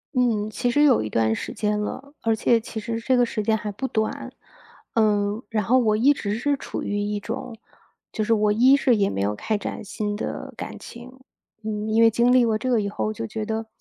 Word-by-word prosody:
嗯， 220 -4 +1
其 245 +2 -1
实 290 - +1
也 - - +6
有 255 - +4
一 110 - -4
段 110 0 +1
时 - - -5
间 210 -1 -1
了， 275 +7 -5
而 225 -1 +2
且 230 +1 +3
其 225 0 -7
实 230 +1 -3
这 255 +2 +1
个 245 -1 +4
时 215 -2 -3
间 220 +1 +2
还 210 -1 -4
不 265 +7 -4
短。 220 -3 -2 0.6
呃， 210 0 +1
然 215 -2 0
后 250 +6 +3
我 220 -4 +3
一 270 +7 +4
直 205 -6 -3
是 280 +5 0
处 - - -6
于 205 0 -2
一 205 0 -2
种 225 +2 -6 0.6
就 215 - -2
是 225 - +2
我 210 -1 +2
一 255 +6 +6
是 255 -4 +3
也 200 -1 +2
没 95 - -3
有 105 +1 0
开 215 - -2
展 - - -5
新 210 0 -3
的 210 - -5
感 - - -7
情， 250 +2 -12 0.4
嗯， 215 0 -3
因 225 +1 +4
为 225 - +7
经 235 +2 +3
历 255 -1 +6
过 220 -2 +2
这 255 +4 -3
个 225 -3 +3
以 200 - -2
后， 215 +1 -2
就 225 +1 -5
觉 215 -1 -4
得 220 0 -3
220 Hz, 255 characters per minute, -24 LUFS, 210-240 Hz, 0.6 s, 为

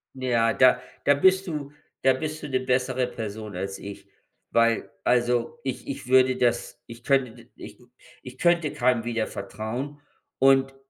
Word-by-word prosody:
Ja, 120 -3 +1
da 130 -1 +5 0.2
da 145 - +6
bist 190 +6 +3
du 150 -3 -5 0.3
da 130 0 +4
bist 155 +3 -5
du 150 - -4
'ne 130 -1 +1
bessere 130 0 0
Person 110 -3 -7
als 95 +2 -4
ich, 100 0 -10 0.4
weil 115 -1 +2 0.2
also, 120 +4 +1
ich 130 -2 -5
ich 135 -2 -6
würde 130 0 +4
das 120 -1 -1
ich 115 +1 -12
könnte 125 -4 0
ich - - -11 0.4
ich 125 0 -11
könnte 170 -3 +2
keinem 120 -2 +1
wieder 115 -2 -1
vertrauen 125 +7 -6 0.4
und 135 0 +4
125 Hz, 155 wpm, -25 LUFS, 115-135 Hz, 0.4 s, da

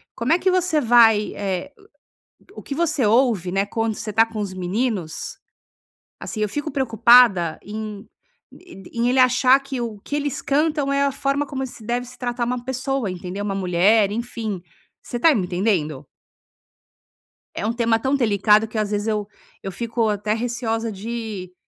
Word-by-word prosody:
como 240 +7 +1
é 350 - +3
que 375 - +2
você 365 -4 +1
vai, 225 -4 +5
eh, 200 +7 -3 0.8
o - - -8
o - - -12
que 280 - -5
você 315 -5 +1
ouve, 220 -5 +2
né, 195 +2 +1
quando 225 +1 -2
você 215 +1 -5
tá 225 +2 +5
com 225 -1 -7
os 200 -3 -3
meninos, 185 -2 -3 0.8
assim, 215 - -6
eu 210 - +1
fico 295 +7 -4
preocupada 230 - +4
em 210 -1 -7 0.5
e 360 -1 -15
d 195 -1 -13
em 235 +1 0
ele 255 - +2
achar 255 +1 +5
que 275 -2 -5
o 225 -3 -4
que - - -5
eles 290 -2 -2
cantam 295 -1 +1
é 280 0 +2
a 280 - +2
forma 280 +1 -1
como 265 -2 -4
se 240 - -12
deve 240 +2 -1
se 250 0 -13
tratar 245 0 -2
uma 245 0 -3
pessoa, 260 -3 -2
entendeu, 180 +2 -6
uma 200 -1 -2
mulher, 195 +3 +3
enfim, 225 -4 -4 0.4
você 240 - -5
tá 310 +4 +5
me 200 - 0
entendendo? 175 -7 -1 1.5
É - - -2
um 225 - 0
tema 230 -1 +1
tão 265 +4 0
delicado 215 -3 +3
que 220 - -8
eu, - - +2
às 205 - -4
vezes, 205 0 -2
eu 210 -2 -1 0.3
eu 195 - -5
fico 230 +2 -1
até 210 0 -1
receosa 230 -1 -2
de, 210 -3 -6
225 Hz, 185 wpm, -22 LUFS, 205-255 Hz, 1.5 s, vai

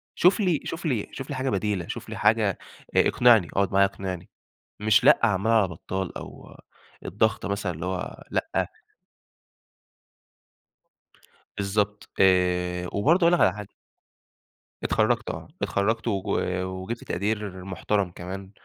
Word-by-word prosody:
شوف 180 +5 +4
لي 180 -7 +2
شوف 165 +1 -5
لي 120 -9 0
شوف 135 - -7
لي 145 - -3
حاجة 130 +1 -1
بديلة، 100 -4 -1
شوف - - -6
لي - - -6
حاجة - - +2 0.4
آآ - - +5
اقنعني، 115 -7 +5
اقعد 100 -1 +1
معايا 100 0 +6
اقنعني، 95 -2 -5 0.5
مش 110 +2 +4
لأ 150 - +7
عمّال 105 0 +2
على 110 -4 +4
بطّال 95 +2 -5
أو - - -11 0.5
الضغط 110 +3 0
مثلًا 100 -2 -2
اللي 80 +2 -6
هو 95 0 -4
لأ - - -1 2.9
بالضبط. 105 +1 -1
آآ 90 -1 +2
وبرضه 160 - +3
أقول 170 +1 +5
لك 175 - +3
على 95 - +4
حاجة. 105 -1 -8 1.1
اتخرّجت - - +1
آه. - - -6
اتخرّجت 110 +4 0
وج 100 -4 -1 0.4
وجِبت 95 +5 -5
تقدير 100 -1 -3
محترم 95 0 -1
كمان 95 +2 -8
100 Hz, 135 wpm, -25 LUFS, 95-115 Hz, 2.9 s, لأ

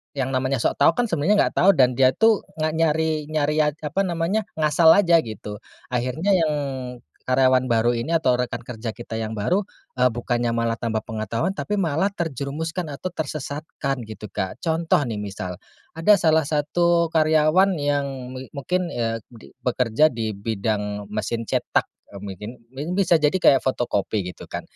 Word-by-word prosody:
yang 135 -1 -1
namanya 130 +1 0
sok - - 0
tahu, - - +5
kan, 245 - +1
sebenarnya 170 +6 +2
enggak - - -2
tahu. 195 +3 +7
Dan, 125 -3 +3
dia, 130 -1 +5
tuh, 225 -2 +3
enggak 155 0 -1
nyari 160 -1 +1
nyari 150 -1 0
ad 150 -1 +2
apa 190 +6 0
namanya, 175 +5 -1
ngasal 155 +1 +3
aja, 170 -5 +5
gitu. 105 -5 -6 0.3
Akhirnya 125 +10 0
yang 165 -5 +3 0.7
karyawan 130 0 +3
baru 120 0 +2
ini, 135 +8 -2
atau 145 -7 +3
rekan 125 -1 -3
kerja 115 -2 -6
kita 115 -1 -7
yang 110 -1 -3
baru, 175 - 0 0.3
eee, 125 0 +4
bukannya 120 0 -1
malah 115 0 0
tambah 110 -2 -2
pengetahuan, 110 - -3
tapi 210 - -3
malah 190 0 0
terjerumuskan 160 +1 -3
atau 185 +6 -5
tersesatkan 145 -3 -4
gitu, 110 -1 -9
Kak. 95 +5 -4
Contoh, 165 -2 +1
nih, 110 - -3
misal, 95 -3 -5 0.4
ada 165 +6 +5
salah 160 -2 +3
satu 170 +3 +1
karyawan 160 +4 +3
yang 145 -1 +1 0.2
mi 130 0 -7
mungkin, 175 +5 -2
ya, 115 -1 -1 0.2
di 115 - -14
bekerja 125 +2 +2
di 110 -3 -3
bidang 105 -1 -3
mesin 110 +2 -3
cetak, - - 0 0.2
eee, 100 - -9
mungkin. 100 +1 -7 0.2
Mi 135 +3 -6
bisa 180 -3 +3
jadi 150 -1 +2
kayak 135 - +5
fotokopi 110 -5 0
gitu, - - -10
kan. - - -5
140 Hz, 165 wpm, -23 LUFS, 115-160 Hz, 0.7 s, tahu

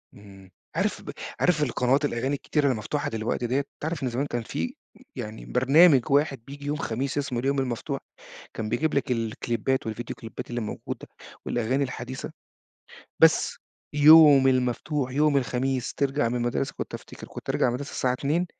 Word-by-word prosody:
اهم، 95 -2 -15 0.2
عارف - - 0
ب - - -7 0.3
عارف 155 -4 +3
القنوات 135 +2 +1
الأغاني 135 +1 -1
الكتيرة 140 0 +1
المفتوحة 125 +5 -2
دلوقتي 115 +2 -2
دِيَّة، 135 +4 +1 0.2
تعرَف 160 -2 -3
إن 130 - 0
زمان 125 +4 -1
كان 120 -4 -3
في 85 -6 -4 0.4
يعني 110 +1 -6
برنامج 135 +1 +5
واحد 140 -1 +2
بييجي 140 +1 -9
يوم 145 +1 -1
خميس 135 0 -2
اسمه 140 -4 -1
اليوم 135 +2 0
المفتوح، 125 -3 -2 0.5
كان 110 -1 -4
بيجيب 130 +7 0
لك 140 -2 0
الكليبات 115 +2 -1
والڨيديو 115 +2 -4
كليبات 115 +1 -8
الموجودة 120 -3 -5 0.4
والأغاني 125 +4 0
الحديثة، 130 0 -6 0.9
بس - - +5 0.4
يوم 150 -2 +8
المفتوح 130 +2 0
يوم 150 +1 +3
الخميس 130 0 -1
ترجَع 140 -3 +1
من 120 - -2
المدرسة 120 +2 -1
كنت - - -5
أفتكر - - -9
كنت - - -7
أرجَع - - +2
من - - +3
المدرسة 125 +4 -3
الساعة 125 - 0
14:00 150 +7 0
130 Hz, 160 wpm, -26 LUFS, 120-145 Hz, 0.9 s, يوم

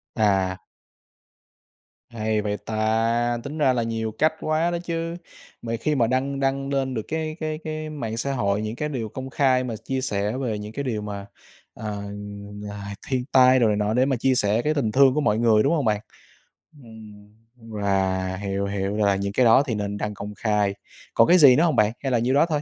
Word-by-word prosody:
À. 95 -4 +2 1.5
Hay 110 -2 -1
vậy 105 0 -2
ta. 115 +2 0
Tính 150 +3 -6
ra 135 -4 +3
là 120 -2 0
nhiều 115 -1 -2
cách 155 +1 +3
quá 160 +2 0
đó 175 - -1
chứ. 165 0 -3 0.5
Mà 115 0 -3
khi 150 +2 0
mà 115 -3 +2
đăng 135 +2 -1
đăng 135 0 -1
lên 135 -2 -1
được 110 - -2
cái 155 -1 -3
cái 155 -1 -3
cái 155 -1 -4
mạng 115 -7 -5
xã 140 +3 -1
hội 100 -4 0
những 110 +1 -4
cái 150 +4 -3
điều 115 -7 -4
công 130 +4 -7
khai 130 -2 +2
mà 120 -3 -4
ch - - -14
chia 135 0 -2
sẻ 105 -1 -1
về 115 -6 -2
những 105 +1 -8
cái 140 - -3
điều 115 -5 -2
mà, 100 -1 -6 0.5
ờ, 105 -2 -5 0.6
là 100 -1 -7
thiên 130 -3 -1
tai 130 0 +6
đồ 115 - +4
này 105 - +2
nọ 105 +1 0
để 125 +2 +3
mà 135 - +1
chia 130 +2 +1
sẻ 105 +1 +2
cái 155 +3 0
tình 120 -8 0
thương 135 +1 +5
của 150 - 0
mọi 105 -6 +2
người, 110 -2 +4
đúng 145 - +2
hông 145 -6 0
bạn? 105 -1 +1 0.8
Ừm, 105 -2 -13 0.5
à, 95 -1 0
hiểu, 100 0 -2
hiểu 100 +1 -2
là 100 -2 +3
những 100 +1 -3
cái 125 - +3
đó 115 +4 +6
thì 115 - -1
nên 105 0 -3
đăng 105 0 -3
công 105 +1 -7
khai. 105 -3 +1 0.4
Còn 115 - +5
cái 180 - +6
gì 135 -6 +8
nữa 160 - +3
hông 165 -5 +2
bạn? 105 -1 +3
Hay 135 - -1
là 120 - +3
nhiêu 125 +3 +1
đó 145 +4 +5
thôi? 150 -2 0
115 Hz, 220 wpm, -24 LUFS, 105-135 Hz, 1.5 s, gì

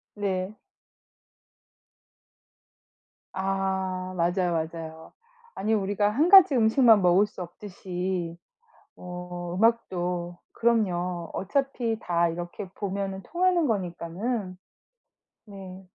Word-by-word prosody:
네. 195 -1 -2 2.8
아. 190 -1 -2
맞아요, 175 +1 +1 0.2
맞아요. 160 -1 -9 0.4
아니 215 +3 0
우리가 205 0 +1
1 290 +11 +2
가지 380 -7 +9
음식만 225 -1 +5
먹을 180 +3 +5
수 205 - -10
없듯이 180 -1 -5 0.6
뭐 180 -1 -7
음악도 180 -5 0 0.2
그럼요. 180 -7 0
어차피 245 -1 -1
다 170 -2 +1
이렇게 175 +3 -6
보면은 195 -1 -4
통하는 350 - +1
거니까는 185 0 -3 0.9
네. 195 -2 -10
190 Hz, 185 characters per minute, -26 LUFS, 175-215 Hz, 2.8 s, 가지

